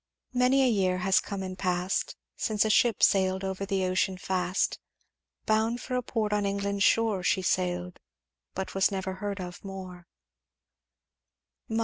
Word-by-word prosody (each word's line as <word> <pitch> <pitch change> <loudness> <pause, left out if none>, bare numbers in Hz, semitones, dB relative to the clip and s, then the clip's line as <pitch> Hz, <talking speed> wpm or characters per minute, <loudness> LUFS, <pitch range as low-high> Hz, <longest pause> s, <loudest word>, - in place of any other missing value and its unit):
"'Many 255 +2 +4
a - - +4
year 190 -6 +2
has 190 +1 +3
come 200 -2 -5
and 185 0 -5
past 180 0 -1 0.2
Since 215 -1 +1
a 220 - +2
ship 230 0 +3
sailed 190 -1 +3
over 190 +1 -3
the 190 -2 0
ocean 185 +1 0
fast, 185 0 -1 0.7
Bound 220 +2 +1
for 255 - -6
a 250 - +1
port 220 -3 -2
on 210 0 +1
England's 200 0 -1
shore, 220 -4 +3
She 185 +1 +1
sailed 180 -1 -1 0.6
but 190 0 -4
was 195 +1 +3
never 190 -1 -3
heard 205 -1 -3
of 180 -1 -7
more.' 185 -3 -8
195 Hz, 150 wpm, -28 LUFS, 185-210 Hz, 0.7 s, Many